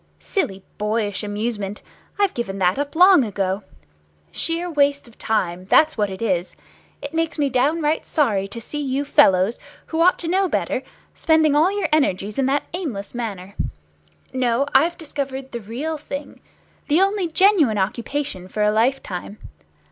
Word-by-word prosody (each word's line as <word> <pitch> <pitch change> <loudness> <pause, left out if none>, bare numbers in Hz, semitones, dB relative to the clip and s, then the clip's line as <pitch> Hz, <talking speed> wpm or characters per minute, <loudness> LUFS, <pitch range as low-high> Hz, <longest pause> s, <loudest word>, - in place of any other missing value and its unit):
"Silly 195 - -2 0.2
boyish 210 -1 -1
amusement. 205 -1 -3 0.3
I've 405 -2 +2
given 195 -5 -4
that 185 +5 +2
up 285 +1 -3
long 360 -3 +7
ago. 195 -2 -2 0.7
Sheer 335 +2 -1
waste 285 -4 +1
of 235 - -17
time, 185 -5 -1
that's 310 +10 +4
what 210 -2 0
it 190 +3 -6
is. 185 -4 -1 0.5
It - - -6
makes 330 0 -1
me 285 -2 +1
downright 300 +5 +1
sorry 210 - +1
to 230 - -7
see 295 +6 -6
you 275 0 -1
fellows, 190 -4 +4 0.3
who 325 0 -2
ought 360 +2 +5
to 335 - -6
know 375 +2 +2
better, - - -1 0.3
spending 315 -2 +3
all 320 +6 +4
your 405 0 -1
energies 210 -7 +1
in 265 - +2
that 280 +2 +1
aimless 275 - -4
manner. 200 -5 -5 0.8
No, 255 0 +1
I've 330 +6 +4
discovered 275 -4 -5
the 235 - -5
real 280 +9 -4
thing, 280 -1 -7 0.5
the 305 +3 +3
only 390 -1 +2
genuine 325 - +4
occupation 225 0 -2
for 210 +3 -2
a 210 - +3
life 240 +5 +1
time. 185 +3 -6
265 Hz, 160 wpm, -22 LUFS, 205-315 Hz, 0.8 s, long